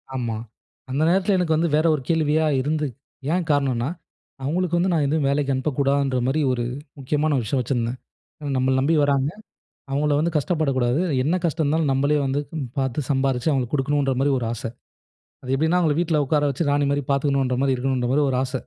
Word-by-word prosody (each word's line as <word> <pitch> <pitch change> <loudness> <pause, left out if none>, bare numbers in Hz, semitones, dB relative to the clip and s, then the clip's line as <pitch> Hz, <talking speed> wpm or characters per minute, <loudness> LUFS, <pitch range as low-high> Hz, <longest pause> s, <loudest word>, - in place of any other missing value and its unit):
ஆமா. 120 -4 -2 0.5
அந்த 135 +3 -1
நேரத்தில 190 +2 +2
எனக்கு 170 -3 +1
வந்து 165 +2 +1
வேற 155 +2 +2
ஒரு 145 - -5
கேள்வியா 160 -1 +2 0.2
இருந்து 150 +2 -1 0.5
ஏன் 180 -1 0
காரணன்னா, 135 -4 +1 0.5
"அவுங்களுக்கு 175 +4 0
வந்து 180 +2 +1
நான் 155 -3 +2
எதும் 150 0 +1
வேலைக்கி 140 0 0
அனுப்பக்கூடாதுன்ற 135 -1 0
மாரி 145 +4 +1
ஒரு, 120 -1 -1 0.4
முக்கியமான 150 +2 0
ஒரு 125 - -1
விஷயம் 130 +5 0
வச்சிருந்தேன். 120 0 -2 0.4
ஏன்னா, 145 -1 -4
நம்பள 130 +1 +2
நம்பி 155 +5 +2
வராங்க. 140 0 +1 0.6
அவுங்கள 145 +1 +1
வந்து 165 +2 0
கஷ்டப்படக்கூடாது, 140 -4 +1 0.2
என்ன 160 +6 +1
கஷ்டம் 160 -1 0
இருந்தாலும் 150 0 +1
நம்பளே 140 +3 +2
வந்து 135 +2 0 0.4
பாத்து, 130 0 -1
சம்பாரிச்சு 135 0 +1
அவுங்களுக்கு 130 -1 0
குடுக்கணுன்றமாரி 140 -1 +1
ஒரு 115 - -3
ஆச." 120 - -8 0.8
அது 130 - -6
எப்பிடின்னா 160 +6 +2
அவுங்கள 155 -4 +2
வீட்ல 160 -3 +1
உட்கார 150 +1 +2
வச்சு 145 +3 -1
ராணிமாரி 145 0 +1
பாத்துக்கணுன்றமாரி 135 -1 +1
இருக்கணுன்றமாரி 130 +2 0
ஒரு 130 - 0
ஆச. 130 -1 -4
140 Hz, 165 wpm, -23 LUFS, 130-155 Hz, 0.8 s, நேரத்தில